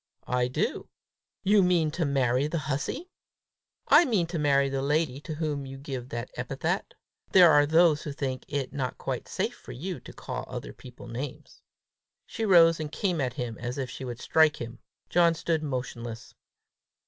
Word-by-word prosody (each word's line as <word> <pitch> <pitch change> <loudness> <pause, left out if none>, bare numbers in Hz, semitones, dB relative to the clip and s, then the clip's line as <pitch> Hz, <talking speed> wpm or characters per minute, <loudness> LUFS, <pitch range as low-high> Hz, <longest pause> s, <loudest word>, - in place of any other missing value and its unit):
"I 125 0 +1
do." 125 - -2 0.5
"You 205 +1 +5
mean 175 -4 +3
to 165 +1 -1
marry 135 -1 +2
the 165 +2 -2
hussy?" 160 - -3 0.8
"I - - +8
mean 215 - +1
to 165 - -1
marry 140 -2 +3
the 135 0 -2
lady 145 -1 0
to 155 0 -6
whom 150 -3 -2
you 135 0 -8
give 135 -3 -6
that 120 0 -5
epithet. - - -2 0.4
There 180 -3 +8
are 145 -1 +5
those 160 -1 +4
who 150 - -5
think 135 -2 -3
it 140 -3 -3
not 130 -3 -3
quite - - -4
safe - - -2
for - - -11
you - - -5
to - - -11
call - - -6
other - - -6
people 125 -1 -12
names!" 125 +3 -7 0.6
She 225 - -3
rose 165 -4 +6
and 155 -1 -4
came 180 -5 -1
at 125 -2 -1
him 120 -5 -5
as 120 +2 -4
if 130 -2 -3
she - - -7
would 120 -2 -5
strike 155 -1 +3
him. 120 0 -7 0.3
John 170 -1 +4
stood 165 -1 -1
motionless. 125 -5 -5
145 Hz, 180 wpm, -28 LUFS, 125-165 Hz, 0.8 s, I